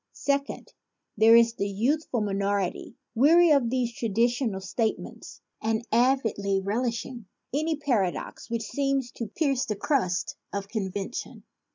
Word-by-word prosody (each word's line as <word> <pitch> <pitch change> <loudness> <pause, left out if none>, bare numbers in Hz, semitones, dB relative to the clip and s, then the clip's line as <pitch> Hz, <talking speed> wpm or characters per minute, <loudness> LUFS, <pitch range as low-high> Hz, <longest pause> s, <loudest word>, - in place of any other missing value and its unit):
Second, 280 0 -2 0.4
there 220 +2 +7
is 230 0 +5
a - - +1
youth 235 +11 0
ful 235 - 0
minority, 200 -2 -1 0.2
weary 320 +8 +5
of 275 -5 +4
these 245 -1 -1
traditional 230 -1 0
state 215 +4 -1
ments - - -11 0.2
and 220 +1 -1
avidly 225 -5 +2
relishing 230 +2 -3 0.3
any 310 +3 0
paradox 235 -10 -2
which 230 -1 -2
seems 275 -1 -1
to 230 - -5
pierce 270 +2 0
the 215 -5 -2
crust 200 -5 -1
of 200 0 -4
convention. 200 0 -4
230 Hz, 135 wpm, -27 LUFS, 200-265 Hz, 0.4 s, there